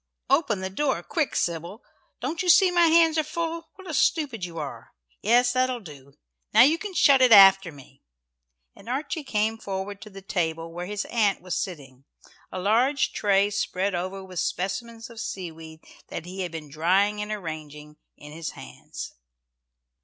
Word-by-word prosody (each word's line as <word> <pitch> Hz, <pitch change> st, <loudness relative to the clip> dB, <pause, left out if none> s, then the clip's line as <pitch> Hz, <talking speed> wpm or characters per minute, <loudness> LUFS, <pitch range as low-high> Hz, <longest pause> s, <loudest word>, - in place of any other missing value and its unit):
"Open 275 Hz, -, +2 dB
the 190 Hz, 0 st, -4 dB
door, 270 Hz, +7 st, -1 dB
quick, 315 Hz, -4 st, -2 dB
Sybil. 170 Hz, -, -3 dB, 0.4 s
Don't 325 Hz, -, -2 dB
you 365 Hz, -, -1 dB
see 360 Hz, +1 st, +6 dB
my 345 Hz, -1 st, +4 dB
hands 325 Hz, -1 st, +4 dB
are -, -, +2 dB
full? 330 Hz, +1 st, -4 dB
What 380 Hz, 0 st, -13 dB
a 320 Hz, -, -5 dB
stupid 275 Hz, -, +1 dB
you 170 Hz, -1 st, -6 dB
are! 150 Hz, -3 st, -7 dB, 0.3 s
Yes, 245 Hz, +3 st, +3 dB
that'll 255 Hz, -1 st, +1 dB
do. 140 Hz, -, -14 dB, 0.4 s
Now -, -, +9 dB
you 310 Hz, +5 st, +3 dB
can 410 Hz, -3 st, -7 dB
shut 275 Hz, -4 st, +5 dB
it 255 Hz, -2 st, +5 dB
after 195 Hz, -3 st, +8 dB
me." 135 Hz, -2 st, -17 dB, 0.7 s
And -, -, -13 dB
Archie 290 Hz, +4 st, -3 dB
came 220 Hz, -3 st, -1 dB
forward 200 Hz, 0 st, -5 dB
to 220 Hz, -, -10 dB
the 195 Hz, -1 st, -12 dB
table 165 Hz, -3 st, -2 dB
where 175 Hz, +1 st, -5 dB
his 210 Hz, 0 st, -3 dB
aunt 210 Hz, -4 st, +1 dB
was 185 Hz, -2 st, -4 dB
sitting, 135 Hz, -7 st, -6 dB, 0.5 s
a -, -, -5 dB
large 240 Hz, +9 st, +2 dB
tray 200 Hz, 0 st, +2 dB
spread 195 Hz, -1 st, -1 dB
over 185 Hz, +2 st, -4 dB
with 185 Hz, -2 st, -6 dB
specimens 225 Hz, +5 st, -3 dB
of 230 Hz, -, -11 dB
seaweed 160 Hz, -5 st, -7 dB, 0.3 s
that -, -, -7 dB
he 185 Hz, +2 st, -6 dB
had 180 Hz, -2 st, -4 dB
been 155 Hz, -3 st, -8 dB
drying 195 Hz, +7 st, +1 dB
and 210 Hz, 0 st, -5 dB
arranging, 155 Hz, -6 st, -7 dB, 0.2 s
in 150 Hz, -, -12 dB
his 160 Hz, 0 st, -6 dB
hands. -, -, -9 dB
200 Hz, 175 wpm, -25 LUFS, 170-255 Hz, 0.7 s, Now